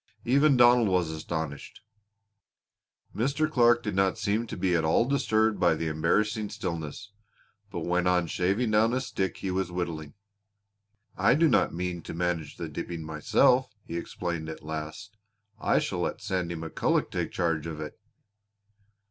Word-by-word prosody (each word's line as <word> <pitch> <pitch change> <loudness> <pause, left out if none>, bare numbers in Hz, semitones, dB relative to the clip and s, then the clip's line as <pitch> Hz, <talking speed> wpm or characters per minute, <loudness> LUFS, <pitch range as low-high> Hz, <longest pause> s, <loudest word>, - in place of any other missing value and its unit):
Even 140 +2 +4
Donald 120 -1 +6
was 90 -4 +1
astonished. 80 -2 -5 1.3
Mr. 140 +7 +1
Clark 120 -5 +4
did 105 - -2
not 95 +2 +2
seem 110 +2 -1
to - - -6
be 90 0 +1
at 80 - +1
all 80 +8 +3
disturbed 110 -5 +1
by 85 -3 +4
the 80 - -3
embarrassing 105 +7 0
stillness, 85 +3 -5 0.6
but - - -5
went 90 +1 0
on 90 -1 +3
shaving 100 +8 0
down 110 +2 +3
a 130 - +1
stick 95 -8 -3
he 95 - -3
was 95 -1 -1
whittling. 85 -4 -4 1.0
"I - - +4
do 165 +2 +4
not - - +3
mean 90 0 -3
to - - -7
manage 85 -3 -2
the - - -4
dipping 85 -2 -5
myself," 105 - +2
he 85 - -6
explained 85 -1 -4
at 80 - -8
last. 80 +6 -6 0.4
"I - - +2
shall - - -1
let - - -2
Sandy 90 -2 -2
McCulloch 80 0 -1
take - - -2
charge 85 -3 -1
of 80 -2 -6
it." 75 - -6
90 Hz, 155 wpm, -28 LUFS, 80-110 Hz, 1.3 s, Donald